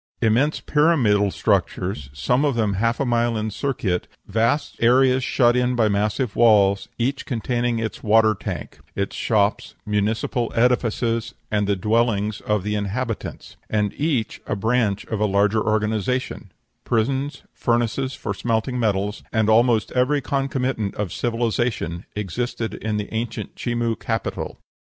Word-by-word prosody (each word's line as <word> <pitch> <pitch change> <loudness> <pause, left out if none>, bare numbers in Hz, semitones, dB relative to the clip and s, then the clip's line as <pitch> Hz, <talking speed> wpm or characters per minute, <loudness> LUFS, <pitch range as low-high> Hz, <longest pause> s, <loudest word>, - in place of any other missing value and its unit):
Immense 120 +7 +2
pyramidal 130 -11 +3
structures, 90 -6 -1
some 125 - +1
of 145 -4 +1
them 110 -3 +1
half 115 +5 0
a 140 - +1
mile 120 -1 +1
in 110 0 -2
circuit; 105 -8 -2 0.2
vast 115 +8 0
areas 130 +2 +4
shut 120 -1 +3
in 125 0 +1
by 115 -2 +3
massive 105 +3 0
walls, 100 -4 +4
each 130 +3 -1
containing 120 -2 -1
its 115 -1 -4
water 110 0 +4
tank, 100 - -6 0.2
its 100 0 -2
shops, 105 -1 0
municipal 110 +3 0
edifices, 115 -1 +1 0.2
and 105 -1 +1
the 100 - +2
dwellings 110 +1 +1
of 105 -2 -1
its 105 - -1
inhabitants, 105 +3 -4
and 105 -2 0
each 140 -7 -1
a - - -1
branch 110 -1 0
of 110 - -3
a 105 - +2
larger 100 +2 +2
organization; 110 +3 -1 0.3
prisons, 135 +5 -1
furnaces 120 +2 0
for 100 - -4
smelting 115 +5 -1
metals, 105 -2 0
and 110 -1 +2
almost 115 -1 +3
every 130 +4 +2
concomitant 130 -6 -1
of 100 -5 -3
civilization, 115 -7 -1
existed 110 +3 -3
in 105 -1 -3
the 105 +1 -5
ancient 115 +1 -3
Chimu 120 -1 -1
capital. 115 -4 -3
115 Hz, 140 wpm, -22 LUFS, 105-125 Hz, 0.3 s, areas